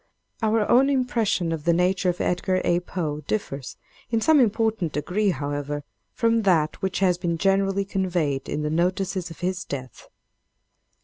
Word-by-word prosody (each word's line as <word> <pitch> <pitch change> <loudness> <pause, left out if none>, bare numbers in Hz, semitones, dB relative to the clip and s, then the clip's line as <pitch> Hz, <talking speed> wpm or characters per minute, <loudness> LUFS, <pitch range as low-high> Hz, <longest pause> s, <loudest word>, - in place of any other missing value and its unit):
Our 220 -1 +2
own 260 +3 +5
impression 235 -10 +1
of 160 -2 -3
the 170 +1 +3
nature 180 +2 +2
of 175 - -2
Edgar 185 +1 0
A. 175 0 +3
Poe, 160 -4 -4
differs 140 -11 -3 0.3
in 230 - +1
some 300 +7 +4
important 220 - +1
degree, 185 +8 0
however, 145 -2 -3 0.3
from 230 -1 +2
that 165 -7 +1
which 190 0 -2
has 180 -2 +3
been 170 -2 -1
generally 195 +2 +1
conveyed 175 -8 -1
in 150 - -2
the 150 - -1
notices 185 +2 0
of 165 - -12
his 180 0 -1
death. 130 -4 -8
180 Hz, 160 wpm, -24 LUFS, 165-205 Hz, 0.3 s, own